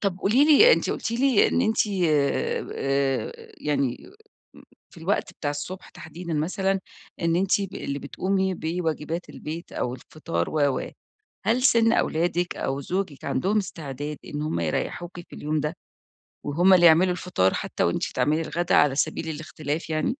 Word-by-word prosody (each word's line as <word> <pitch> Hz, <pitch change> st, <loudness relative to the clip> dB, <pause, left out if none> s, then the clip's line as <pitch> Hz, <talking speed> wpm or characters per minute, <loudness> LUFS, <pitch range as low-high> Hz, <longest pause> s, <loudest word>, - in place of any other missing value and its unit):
طَب 190 Hz, -2 st, -1 dB
قولي 235 Hz, +10 st, +4 dB
لي 315 Hz, -, +8 dB
أنتِ -, -, +1 dB
قُلتِ -, -, -3 dB
لي 245 Hz, -1 st, +3 dB
إن -, -, +1 dB
أنتِ 220 Hz, 0 st, +2 dB, 0.2 s
آآ 145 Hz, -3 st, +1 dB
ب -, -, -10 dB
آآ 135 Hz, -, 0 dB, 0.3 s
يعني 140 Hz, -4 st, 0 dB, 0.6 s
م -, -, -15 dB, 0.3 s
في -, -, -19 dB
الوقت 185 Hz, 0 st, -1 dB
بتاع 145 Hz, -4 st, -3 dB
الصُبح 175 Hz, +6 st, -6 dB
تحديدًا 170 Hz, -1 st, -7 dB
مثلًا 190 Hz, +5 st, 0 dB, 0.4 s
إن 165 Hz, 0 st, +1 dB
أنتِ 195 Hz, +2 st, +2 dB
ب 195 Hz, -1 st, -5 dB
اللي 140 Hz, 0 st, -4 dB
بتقومي 190 Hz, +6 st, -1 dB
بواجبات 165 Hz, 0 st, -3 dB
البيت 160 Hz, +3 st, -7 dB
أو 125 Hz, -, -2 dB
الفطار 85 Hz, -, -4 dB
و، 145 Hz, -3 st, +2 dB
و، -, -, -6 dB, 0.6 s
هل 240 Hz, +3 st, +2 dB
سِن 230 Hz, -3 st, +5 dB
أولادِك 175 Hz, 0 st, 0 dB
أو 135 Hz, +1 st, -2 dB
زوجِك 175 Hz, -1 st, -3 dB
عَندهم 195 Hz, +9 st, +1 dB
استعداد 150 Hz, -6 st, -5 dB
إن 150 Hz, 0 st, -4 dB
هُم 155 Hz, -, -1 dB
يريحوكِ 175 Hz, -, -3 dB
في -, -, -13 dB
اليوم 150 Hz, 0 st, -1 dB
ده؟ 150 Hz, +3 st, -3 dB, 0.7 s
وهُم 175 Hz, +6 st, +4 dB
اللي 175 Hz, -1 st, +6 dB
يعملوا 175 Hz, +3 st, +6 dB
الفطار 165 Hz, -, 0 dB
حتّى -, -, -2 dB
وأنتِ -, -, +1 dB
تعملي 155 Hz, +2 st, +2 dB
الغدا 175 Hz, +2 st, -1 dB
على 145 Hz, -2 st, +5 dB
سبيل 155 Hz, +3 st, -1 dB
الاختلاف 155 Hz, 0 st, -4 dB
يعني؟ 155 Hz, -, 0 dB
165 Hz, 165 wpm, -25 LUFS, 150-190 Hz, 0.7 s, لي